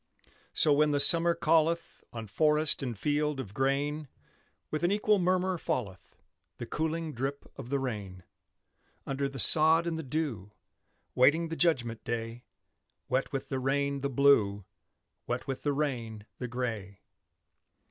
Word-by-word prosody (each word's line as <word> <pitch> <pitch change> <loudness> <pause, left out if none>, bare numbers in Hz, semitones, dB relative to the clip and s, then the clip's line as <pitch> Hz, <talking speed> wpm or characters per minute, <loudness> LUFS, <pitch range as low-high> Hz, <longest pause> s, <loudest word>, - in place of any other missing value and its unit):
So, 150 - +5
when 150 +1 +3
the 145 -1 0
summer 170 +3 +7
calleth, 165 0 0
On 115 -1 -7
forest 150 +8 +2
and 120 -5 -5
field 150 +3 -1
of 105 -7 -7
grain, 140 +4 -1 0.6
With 155 - -2
an 175 +2 +1
equal 210 0 +2
murmur 185 0 0
falleth 95 - -5 0.4
The - - -6
cooling 160 0 -3
drip 135 +3 -5
of 125 -3 -10
the 140 - 0
rain: 105 -9 -6 0.8
Under 140 0 -3
the 135 - -10
sod 160 +6 +5
and 165 -1 -3
the - - -5
dew, 130 - -4 0.6
Waiting 160 +6 +3
the 165 - -4
judgment 125 -10 0
day; 115 +1 -5 0.6
Wet 130 +1 -1
with 135 -2 -5
the 135 - -2
rain, 140 +1 -1
the 140 - -2
Blue, 115 -8 +2 0.6
Wet - - -3
with 135 -1 -5
the 145 - -1
rain, 120 -7 -4
the 125 - -4
Gray. 115 -6 -5
140 Hz, 145 wpm, -29 LUFS, 120-155 Hz, 0.8 s, summer